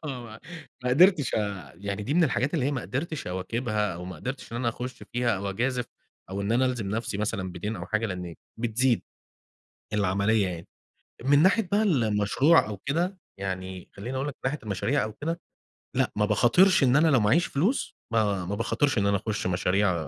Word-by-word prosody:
آه، 130 -4 -5
ما 110 -1 -11 0.4
ما 125 - +1
قدرتش 165 - +5
أ 100 -10 -3 0.2
دي 105 +9 -3
من 175 -1 +5
الحاجات 130 +3 0
اللي 140 -6 +1
هي - - +1
ما 130 -3 -2
قدرتش 155 +4 -4
أواكبها 105 +1 -1
أو 90 +1 -7
ما 90 -2 -7
قدرتش 125 - -6
إن - - -3
أنا 120 -1 0
أخش 125 +2 -5
فيها 120 -3 +1
أو 100 +1 -3
أجازف 125 +4 -1 0.5
أو 100 +1 -3
إن 100 +3 0
أنا 130 +2 +3
ألزم 120 -6 -2
نفسي 110 -1 -2
مثلًا 100 -4 -2
بدَين 105 +5 -4
أو 85 +1 -6
حاجة 110 +1 0
لأن 90 -3 -5 0.2
بتزيد 120 +1 +1 0.9
العملية 100 +1 +2
يعني. 85 -1 -6 0.6
من 145 +2 +5
ناحية 195 +1 +3
بقى 210 +2 +4
ال 150 - +2
المشروع 110 +10 +4
أو 105 - -4
كده 175 - -1 0.2
يعني 95 -1 -5
خليني 120 +7 -6
أقول 135 +2 -1
لَك 140 - -5
من - - -67
ناحية 150 - -4
المشاريع 110 +7 0
أو 110 - -5
كده، 165 +7 -4 0.6
لأ، - - +2
ما 105 - +2
باخاطرش 135 - +4
إن 125 +1 +4
أنا 160 +2 +5
لو 135 -6 +5
معايش 115 +12 +3
فلوس، 190 - 0 0.2
ما 100 -5 +1
باخاطرش 130 +4 +1
إن 100 - +2
أنا 100 - +3
أخش 100 -1 -3
مشاريع، 95 +2 +2
115 Hz, 195 wpm, -27 LUFS, 100-135 Hz, 0.9 s, قدرتش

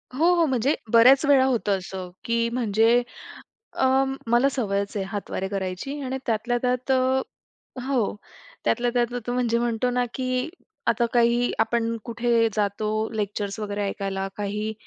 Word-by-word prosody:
हो, 315 - +2
हो. 335 -1 +3
म्हणजे 265 +1 +1 0.2
बऱ्याच 255 +5 +7
वेळा 275 -2 +5
होतं 220 -6 +1
असं 185 -1 -7 0.2
की 230 0 +1
म्हणजे 230 0 +3 0.8
अ, 265 +1 +4 0.2
मला 240 +4 +4
सवयच 200 -6 -2
आहे 195 -1 -1
हातवारे 195 -1 -4
करायची 195 +8 -4
आणि 260 +1 -3
त्यातल्या 235 +2 0
त्यात 250 +1 0 0.9
हो. 250 -6 0 0.5
त्यातल्या 245 0 +2
त्यात 240 0 +1
तो 245 - -1
म्हणजे 240 -2 +1
म्हणतो 240 +1 0
ना 250 0 +1
की 255 +2 -1 0.4
आता 235 +1 +3
काही 240 0 +3
आपण 230 0 +1
कुठे 235 -1 +2
जातो 210 0 -1 0.3
लेक्चर्स 205 0 -3
वगैरे 205 -1 -3
ऐकायला 195 -1 -3
काही 210 +2 -3
235 Hz, 140 wpm, -24 LUFS, 205-250 Hz, 0.9 s, बऱ्याच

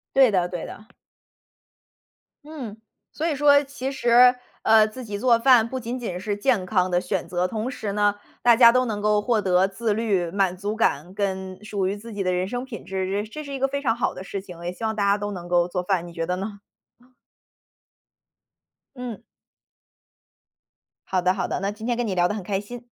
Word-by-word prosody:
对 265 -3 +6
的 185 -3 +2
对 175 -2 -5
的。 220 +3 -12 1.5
嗯， 275 -9 -8 0.4
所 315 - -2
以 300 - -1
说 285 0 +5
其 270 -1 -5
实， 245 -1 +5 0.3
呃， 220 -1 +6
自 250 +4 -9
己 205 -2 -5
做 235 +2 +3
饭 235 -2 +5
不 260 - -4
仅 240 0 -4
仅 185 -7 -4
是 205 +2 -3
健 205 -4 +1
康 185 -2 +1
的 175 0 +2
选 180 - -3
择， 180 0 0
同 220 +5 -3
时 215 -5 -4
呢， 205 0 +2 0.3
大 240 -1 +6
家 235 -1 +8
都 255 +1 +3
能 215 -4 -3
够 210 0 +2
获 225 0 +1
得 185 -1 +3
自 210 +2 -1
律、 205 -6 0
满 190 -1 0
足 205 +3 -3
感， 180 -5 0
跟 190 -1 -3
属 200 -3 -2
于 195 - -1
自 225 +2 -10
己 200 -2 -3
的 185 - +1
人 180 +1 -1
生 245 +2 -3
品 245 -6 -9
质， 190 -1 -3 0.2
这 215 - -13
这 305 +5 -7
是 280 - -8
一 270 - -5
个 270 - +2
非 280 +1 -3
常 235 -5 +1
好 235 - -1
的 185 - -9
事 195 - -5
情。 180 -3 -11
也 175 - -3
希 180 - -13
望 220 -1 -1
大 205 - +1
家 200 0 +4
都 205 0 -4
能 180 -3 -7
够 175 0 +2
做 180 0 -3
饭， 180 -2 0
你 170 - -11
觉 165 0 -3
得 180 - -1
呢？ 200 +2 -5 2.4
嗯。 250 -4 -6 1.9
好 190 -1 +1
的 180 +1 +3
好 195 - -2
的， - - -3
那 195 - -1
今 215 +2 -8
天 240 - 0
跟 240 0 -1
你 195 - -1
聊 175 -1 +3
得 210 - -2
很 210 - -5
开 195 +1 -2
心。 240 +3 -10
210 Hz, 230 characters per minute, -24 LUFS, 190-240 Hz, 2.4 s, 家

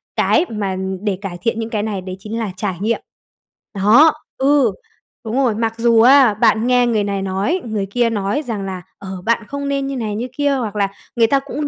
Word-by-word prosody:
cái 335 - +3
mà 205 -4 -2 0.3
để 205 -3 -1
cải 185 -3 -5
thiện 230 +3 -1
những 225 0 -3
cái 215 -2 -2
này 210 -3 -3
đấy 185 0 -6
chính 215 +3 -5
là 220 -4 -3
trải 190 -2 -2
nghiệm. 230 +2 0 0.7
Đó, 225 +11 +6 0.2
ừ, 280 +1 +3 0.5
đúng 220 +1 -3
rồi, 245 -6 +2
mặc 225 0 -1
dù 230 -1 +4
á, 260 -1 +6
bạn 220 +2 +2
nghe 245 -1 +3
người 220 -3 +1
này 200 -1 -2
nói, 195 - -1
người 215 -3 -2
kia 240 +1 +2
nói 215 +7 -1
rằng 215 -4 -3
là 185 -2 -5 0.2
"Ờ, 195 - -9 0.2
bạn 230 0 +1
không 280 0 -4
nên 275 -1 -1
như 275 - -3
này, 215 -4 -3
như 235 +4 -3
kia." 285 -1 +2
hoặc 220 -5 -3
là 200 -1 +1 0.3
người 230 -2 +4
ta 275 +4 +3
cũng 285 +2 -4
225 Hz, 220 wpm, -18 LUFS, 205-255 Hz, 0.7 s, Đó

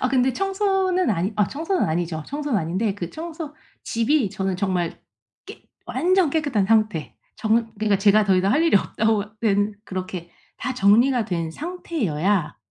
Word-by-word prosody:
아 255 - +1
근데 260 0 +2
청소는 385 - +1
아니 190 +1 0
아 210 - +3
청소는 330 - -1
아니죠. 160 -1 -2
청소는 290 -5 -1
아닌데 190 +6 -1
그 175 -4 -5
청소 320 -2 -7 0.3
집이 230 -1 +1
저는 190 -2 -2
정말 185 -3 -1 0.5
깨 - - -11 0.2
완전 365 -3 +2
깨끗한 285 -11 +1
상태 215 -7 +1 0.2
정말 225 +1 +1
그러니까 210 -2 +2
제가 210 +1 +5
더 190 -2 +3
이상 195 +2 +2
할 305 +4 +3
일이 330 - +5
없다고 215 +1 0
된 205 -1 +1
그렇게 185 -3 -6 0.3
다 260 - -3
정리가 235 +3 +4
된 170 -5 -2
상태여야 205 - -2
215 Hz, 320 characters per minute, -23 LUFS, 190-295 Hz, 0.5 s, 제가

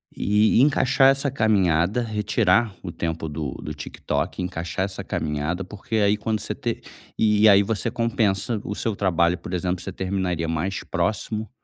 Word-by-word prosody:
E 105 +3 +3
encaixar 135 -1 +4
essa 135 +1 +1
caminhada, 100 - +2
retirar 110 -1 +1
o 90 - -6
tempo 80 -1 -3
do 75 -3 -4
do 75 - -6
TikTok, 75 +4 -3
encaixar 90 +1 -3
essa 95 -1 -6
caminhada, 75 +5 -2
porque 105 +3 -6
aí 105 0 +3
quando 110 0 -2
você - - -4
te - - -3 0.4
e 105 0 +4
aí 100 0 +7
você 105 +1 -1
compensa 110 -2 0
o 105 - -4
seu 110 0 -2
trabalho. 85 -3 +2
Por 90 - -8
exemplo, 90 0 -1
você 95 - -6
terminaria 90 -3 -2
mais 85 +4 -2
próximo, 110 0 -2
100 Hz, 160 wpm, -23 LUFS, 90-110 Hz, 0.4 s, aí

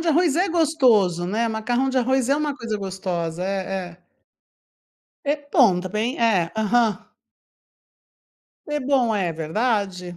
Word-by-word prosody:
de 330 - -2
arroz 325 -1 +3
é 370 +2 +2
gostoso, 250 - +2
né. 220 +5 0
Macarrão 240 +4 -1
de 260 - -2
arroz 260 0 +1
é 280 - +3
uma 295 -2 -1
coisa 230 -3 -4
gostosa, 180 -4 -4
é 190 -2 -3
é. 175 +1 -19 1.2
É 290 +1 +1 0.2
bom 200 -9 +5
também, 215 +7 -2
é, 195 -8 +2
aham. 220 -1 +1 1.6
É 295 0 -2
bom, 255 -4 +1
é 180 -5 -1
verdade. 180 +1 -2
220 Hz, 135 wpm, -22 LUFS, 185-265 Hz, 1.6 s, bom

